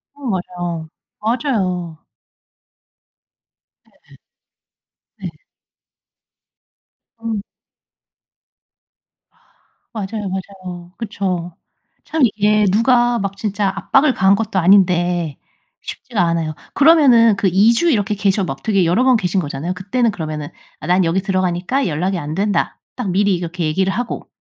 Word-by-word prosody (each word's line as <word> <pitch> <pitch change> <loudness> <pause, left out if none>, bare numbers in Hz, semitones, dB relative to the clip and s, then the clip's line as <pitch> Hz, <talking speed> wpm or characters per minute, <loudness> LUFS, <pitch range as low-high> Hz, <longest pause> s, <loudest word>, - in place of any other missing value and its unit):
어 285 - -15
맞아요. 175 -5 -4 0.3
맞아요. 195 - -1 1.9
네. - - -23 1.0
네. - - -5 1.9
음. 225 -3 -2 2.5
맞아요, 210 0 -4
맞아요. 185 -2 -7
그쵸. 185 -6 -3 0.5
참 320 - -3
이게 210 -1 +2
누가 240 +3 +3
막 195 -2 -3
진짜 205 -1 -1
압박을 275 0 +3
가한 190 -2 +4
것도 215 -2 -1
아닌데 175 -4 +3 0.5
쉽지가 230 -7 -4
않아요. 165 -2 0 0.2
그러면은 265 -9 +6
그 195 - +1
2 195 +5 +4
주 340 +9 +2
이렇게 210 -7 +1
계셔 200 0 +1
막 140 -6 -5
되게 195 -4 +2
여러 180 +10 +2
번 260 -1 +5
계신 190 -3 0
거잖아요. 150 +2 -3
그때는 215 +6 0
그러면은 155 -5 -5 0.3
"아 - - -7
난 180 +1 +3
여기 170 +4 +1
들어가니까 185 +6 0
연락이 180 +4 -1
안 150 0 -5
된다." 200 +2 0 0.2
딱 245 -6 -3
미리 200 +1 +2
이렇게 175 0 -4
얘기를 190 +5 +1
하고 235 +3 -4
195 Hz, 240 characters per minute, -18 LUFS, 175-220 Hz, 2.5 s, 그러면은